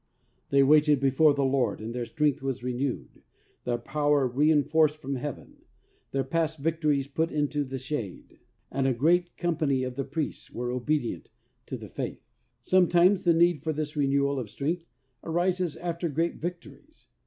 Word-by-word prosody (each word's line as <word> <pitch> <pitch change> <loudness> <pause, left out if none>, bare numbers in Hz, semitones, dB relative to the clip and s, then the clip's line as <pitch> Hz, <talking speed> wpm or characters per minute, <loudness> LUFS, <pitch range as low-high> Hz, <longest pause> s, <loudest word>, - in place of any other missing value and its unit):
They 140 0 +5
waited 150 0 +5
before 140 +2 +4
the 140 -1 +1
Lord 130 -5 +1
and 110 +2 -6
their 120 -1 -3
strength 150 -3 0
was 135 -3 -3
renewed, 125 +1 -3 0.4
their 120 -1 0
power 145 +3 +1
rein 145 +4 +3
forced 155 +1 +2
from 140 -3 -5
Heaven, 135 +1 -6 0.5
their 135 0 -1
past 160 +3 -1
victories 150 -2 0
put 160 +4 -1
into 150 -1 0
the 135 -1 -5
shade 130 -7 -6 0.3
and 135 -1 0
"a 130 - +1
great 175 +7 +2
com 175 -2 -1
pany 140 -5 +1
of 130 - -4
the 135 +2 -3
priests 145 +3 -4
were 120 0 -3
obedient 125 0 -2 0.4
to - - -4
the - - -9
faith." - - -6 0.4
Sometimes 180 +1 +4
the 170 - +4
need 170 -1 +3
for 160 - -2
this 150 0 -4
renewal 140 -1 +1
of 115 -5 -5
strength 160 +9 -3 0.4
arises 175 0 0
after 170 0 -3
great 165 +4 -1
victories. 180 - -8
145 Hz, 165 wpm, -27 LUFS, 135-165 Hz, 0.5 s, They